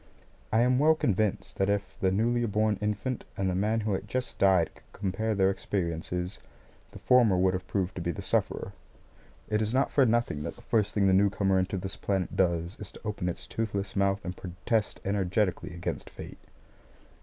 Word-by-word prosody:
I 110 - +4
am 125 +1 +3
well 155 +2 +5
convinced 105 -7 0
that 95 +1 +2
if 100 -1 -1
the 95 - +2
newly 120 +5 +2
born 105 -1 +1
infant 105 +4 -2
and 95 - 0
the 90 - +1
man 105 +4 +1
who 105 -1 -1
had 95 - -3
just 130 0 -3
died 95 -4 +4
could - - -20
compare 105 +3 -1
their 95 -1 +4
experiences, 90 -1 -3 0.5
the - - -10
former 120 -7 +4
would 95 +1 +3
have 95 - -4
proved 95 -2 -1
to 90 - -5
be 85 - -2
the 85 - -4
sufferer. - - -1 0.7
It 105 0 +1
is 110 +3 -1
not 135 - +2
for 140 - +4
nothing 115 -10 +1
that 85 - -5
the 120 - -16
first 110 -4 +1
thing 100 -2 +3
the 95 - +4
newcomer 95 0 +3
into 95 +2 -1
this 95 +1 -5
planet 95 -2 -1
does 85 +1 +1
is 105 - -7
to - - -13
open 100 -4 -2
its 85 - -5
toothless 100 -3 -3
mouth 100 0 +1
and 90 +1 -4
protest 95 +5 -2
energetically 95 -1 0
against 85 0 -4
fate. - - -10
100 Hz, 195 wpm, -29 LUFS, 95-110 Hz, 0.7 s, well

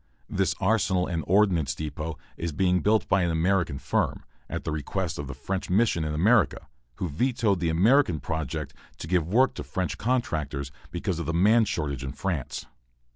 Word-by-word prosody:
This 95 0 +1
arsenal 95 -3 +2
and 85 -4 -2
ordnance 90 -8 +3
depot 75 +1 -5 0.2
is 85 0 -3
being 90 +4 +2
built 105 +6 +2
by 95 - +3
an 85 - +1
American 85 -2 +1
firm, 70 0 -1 0.2
at - - -4
the - - -3
request 85 +4 -3
of 70 - -4
the 70 - -6
French 95 +8 -4
Mission 95 -4 +2
in 75 -1 -2
America, 100 - +3 0.3
who 90 - -3
vetoed 105 - +1
the 85 -1 0
American 90 - +4
project 75 -2 -4 0.2
to - - -6
give 85 -1 +1
the 90 +6 -4
work 130 +2 +5
to - - -6
French 95 -1 -3
contractors, 75 - -1 0.2
because 90 0 -3
of 85 - -4
the 85 - -1
man 110 +6 +5
shortage 70 -8 -2
in 65 +1 -4
France. 80 -3 -3
85 Hz, 180 wpm, -27 LUFS, 75-100 Hz, 0.3 s, work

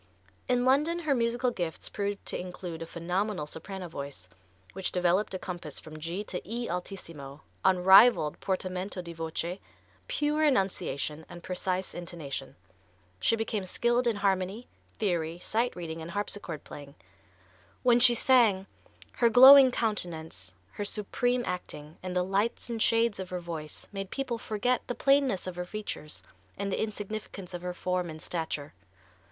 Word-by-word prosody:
In 245 0 +2
London 295 +6 +3
her 310 -5 +1
musical 240 0 +1
gifts 175 -7 -4
proved 205 0 -3
to - - -2
include 180 -2 -6
a 165 - -5
phenomenal 180 +1 -2
soprano 185 +4 -7
voice, 140 - -7 0.5
which 190 0 -2
developed 180 +3 +1
a - - 0
compass 175 -5 -6
from 155 0 -10
G 170 +6 -3
to 185 - -5
E 235 +3 -4
altissimo, 165 -6 -6 0.2
unrivalled 190 -2 +6
portamento 185 0 -2
di 170 -1 -7
voce, 165 +3 -4 0.5
pure 305 -10 +1
enunciation 190 - 0
and 175 0 -10
precise 185 0 -2
intonation. 160 -6 -6 0.6
She 230 - +3
became 220 -2 -2
skilled 240 +6 +1
in 230 - +2
harmony, 195 +3 0 0.3
theory, 170 -5 0
sight 235 +3 0
reading 165 -2 -5
and 160 - -7
harpsichord 200 -4 -4
playing. 145 0 -10 0.9
When 245 -1 +5
she 245 -1 +6
sang, 230 -7 +4 0.5
her 235 - +5
glowing 265 +3 +10
countenance, 165 - -2 0.2
her 205 - -4
supreme 245 +4 -1
acting 160 -4 -6
and 185 -1 -5
the 180 - +3
lights 200 +6 -1
and 225 -1 -3
shades 230 -2 +3
of 185 -1 -5
her 180 - -3
voice 160 -3 -7
made 195 -1 -5
people 255 -4 -3
forget 245 +4 0
the 245 - -3
plainness 275 -7 +3
of 185 -1 -5
her 180 - -3
features 205 -7 -6 0.3
and 200 0 -2
the - - -1
insignificance 210 -3 -5
of 175 - -5
her 180 0 -4
form 180 -1 -1
and 155 0 -8
stature. 160 -4 -3
190 Hz, 150 wpm, -29 LUFS, 170-230 Hz, 0.9 s, glowing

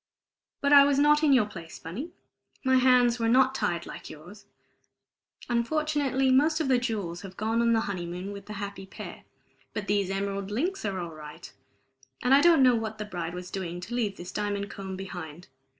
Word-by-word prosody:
But 285 0 +3
I 280 -1 +10
was 280 -1 +2
not 295 +1 +5
in 305 -2 +4
your 250 -6 +5
place, 170 -5 -10
Bunny. 215 - -6 0.5
My 260 -1 +4
hands 250 -2 +4
were 230 0 +1
not 260 +2 +4
tied 175 -8 -1
like - - -9
yours. 190 +7 -12 1.0
Unfortunately, 270 +1 +1
most 305 +5 +3
of 305 -4 -1
the 255 -2 +4
jewels 205 -8 -3
have 190 -2 -10
gone 225 +2 0
on 235 0 +3
the 225 - +3
honeymoon 180 -1 -4
with 200 -1 -9
the 210 - -6
happy 200 -1 -6
pair; - - -9 0.5
but 210 - -4
these 200 -2 0
emerald 195 0 -3
links 310 - -2
are 195 -2 -2
all 170 -2 -5
right, 150 -1 -11 0.7
and 250 - +4
I 280 - +7
don't 330 -4 +6
know 250 -1 +6
what 220 -1 -2
the 210 - -4
bride 175 -4 -5
was 180 0 -7
doing 175 -2 -4
to 195 +7 -7
leave 215 -5 -1
this 175 +1 -8
diamond 205 0 -3
comb 190 -1 -6
behind. 175 -4 -8
210 Hz, 195 wpm, -27 LUFS, 190-260 Hz, 1.0 s, I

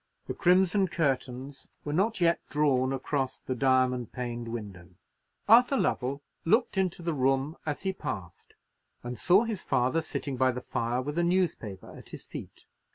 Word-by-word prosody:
The - - -4
crimson 190 +2 +3
curtains 135 -4 -2 0.2
were 145 - -2
not 200 +7 +1
yet 170 -1 +3
drawn 135 -3 +2
across 135 0 -2
the 130 - -4
diamond 130 -2 +2
paned 120 -2 -4
window. 100 -6 -7 0.6
Arthur 245 +5 +6
Lovell 140 - -1 0.2
looked 220 +8 +2
into 185 -2 -1
the 170 -1 -1
room 135 +2 +1
as 150 +3 -3
he 190 -1 0
passed, 95 - -7 0.5
and 120 0 -6
saw 190 +5 +5
his 225 -5 -3
father 130 +4 +1
sitting 140 -4 -4
by 130 0 +3
the 125 - -4
fire, 120 +1 -2
with 145 +5 -3
a - - +2
newspaper 170 - -1
at - - -13
his - - -9
feet. - - -10
135 Hz, 160 wpm, -29 LUFS, 125-175 Hz, 0.6 s, Arthur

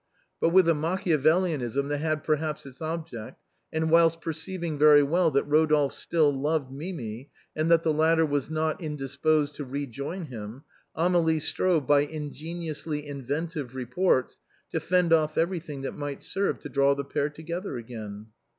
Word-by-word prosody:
But - - +3
with 180 0 +5
a 165 - +5
Machiavelism 155 - +1
that 145 0 -1
had 155 0 -1
perhaps 155 -1 -1
its 135 +1 -12
object, 160 -8 -5 0.3
and 160 0 0
whilst 165 0 +5
perceiving 165 0 -4
very 150 -1 +7
well 165 +4 +3
that 140 -2 +2
Rodolphe 150 -1 +3
still 155 -4 +2
loved 140 0 -1
Mimi, 135 - -6 0.3
and 155 +1 0
that 165 -1 +5
the 160 - +2
latter 160 +1 +3
was 145 -2 -1
not 155 +1 -1
indisposed 150 0 0
to 145 - -4
re 140 +2 -4
join 140 +8 -5
him, 115 0 -8 0.3
Amélie 165 -1 +3
strove, 160 -1 +1
by 145 +1 +5
ingeniously 155 +1 -4
inventive 145 0 -4
reports, 130 +2 0 0.3
to - - 0
fend 180 -2 +2
off 155 -1 +2
everything 165 -5 -2
that - - -3
might 145 -1 -5
serve 195 0 0
to 145 - -7
draw 140 0 +3
the 140 0 -4
pair 145 +1 -1
together 165 +2 -5
again." 110 -3 -8
155 Hz, 160 wpm, -27 LUFS, 140-165 Hz, 0.3 s, very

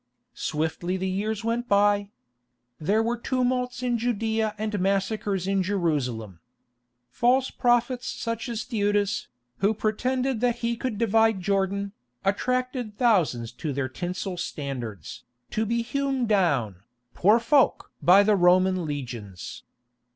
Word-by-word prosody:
Swiftly 160 +4 -2
the 190 +1 -2
years 205 +3 -2
went 235 +2 -1
by. 205 0 +3 0.7
There 205 +8 +2
were 235 +1 -1
tumults 250 0 -1
in 240 -2 0
Judæa 220 -2 0
and 215 -1 -2
massacres 195 0 0
in 195 0 +2
Jerusalem. 140 - -1 0.7
False 255 - +2
prophets 245 0 +1
such 230 +1 -3
as 230 -1 -3
Theudas, 205 -2 0 0.3
who 205 +3 +2
pretended 250 +3 -1
that 245 -2 +2
he 235 0 +1
could 240 -2 -3
divide 225 -1 +3
Jordan, 200 +1 0 0.3
attracted 250 +2 -1
thousands 165 - +2
to 150 +5 -4
their 135 -1 -1
tinsel 180 +5 -4
standards, 130 - -5 0.3
to 220 0 0
be 235 +1 0
hewn 270 0 -1
down, 145 - +1 0.4
poor 210 +5 +5
folk! 265 +4 +2
by 190 +3 +7
the 210 0 +4
Roman 185 -1 +3
legions. 120 - -6
205 Hz, 125 wpm, -26 LUFS, 180-235 Hz, 0.7 s, by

